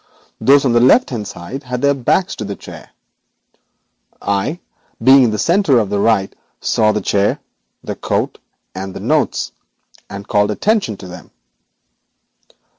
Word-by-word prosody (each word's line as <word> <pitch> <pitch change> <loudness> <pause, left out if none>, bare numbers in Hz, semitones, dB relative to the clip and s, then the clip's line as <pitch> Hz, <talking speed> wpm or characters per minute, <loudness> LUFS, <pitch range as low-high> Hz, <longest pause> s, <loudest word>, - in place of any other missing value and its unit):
Those 140 +1 +4
on 125 - +2
the 120 - +4
left 135 - +4
hand 110 -5 -4
side 125 +11 -7
had 125 -1 -5
their 140 0 +4
backs 140 +8 0
to - - -4
the 100 -1 -5
chair. - - -12 1.3
I, 100 - -2 0.4
being 130 +1 +7
on - - +2
the 105 - -2
centre 170 - +3
to 110 - +2
the 100 +1 -2
right, 100 -2 +1 0.2
saw 110 -1 +2
the 105 - -2
chair, 100 0 +1 0.4
the - - -4
coat, - - -2 0.3
and 95 0 -6
the - - -5
notes, - - 0 0.6
and 100 0 -8
called 105 0 +2
attention 195 - 0
to 95 - -10
them. 90 -2 -11
110 Hz, 155 wpm, -17 LUFS, 100-135 Hz, 1.3 s, being